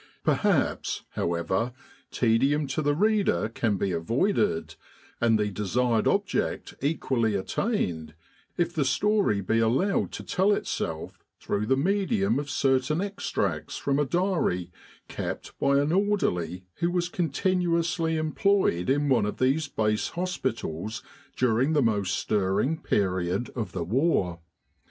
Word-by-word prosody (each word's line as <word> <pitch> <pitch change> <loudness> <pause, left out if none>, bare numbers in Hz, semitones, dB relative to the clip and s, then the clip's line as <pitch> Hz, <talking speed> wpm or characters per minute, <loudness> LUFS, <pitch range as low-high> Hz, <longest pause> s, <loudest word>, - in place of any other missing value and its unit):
Perhaps, - - +1
however, 85 +8 -1 0.4
tedium 135 +6 +2
to 135 +3 -2
the 145 -1 +1
reader 205 - +2
can 110 -2 0
be 95 0 -1
avoided, 195 - 0 0.5
and 115 -2 +4
the 105 -1 0
desired 110 +4 +1
object - - 0
equally 130 -7 0
attained, 90 - -2 0.4
if 175 0 0
the 155 -4 +1
story 135 - +2
be 110 +4 +1
allowed 130 - +1
to - - -6
tell 195 +3 +2
itself 80 - -3 0.2
through 105 +1 -2
the 135 - +3
medium 195 - +1
of 145 0 -5
certain 135 +2 +1
extracts 200 +1 -2
from 140 0 0
a 145 - +2
diary 160 - 0 0.4
kept - - -5
by 140 0 +3
an 145 +2 +2
orderly 95 - 0
who 170 +1 +1
was 175 -1 0
continuously 170 -1 0
employed 155 - +1
in 145 +2 +2
one 130 -6 +3
of - - -4
these 140 +4 +1
Base 105 -5 0
hospitals 115 - -3 0.3
during 125 +4 +2
the 145 -3 +3
most 100 -5 +1
stirring 105 +8 +1
period 95 +2 0
of 115 -4 -3
the 90 - -2
war. 95 - +1
130 Hz, 130 wpm, -27 LUFS, 105-175 Hz, 0.5 s, and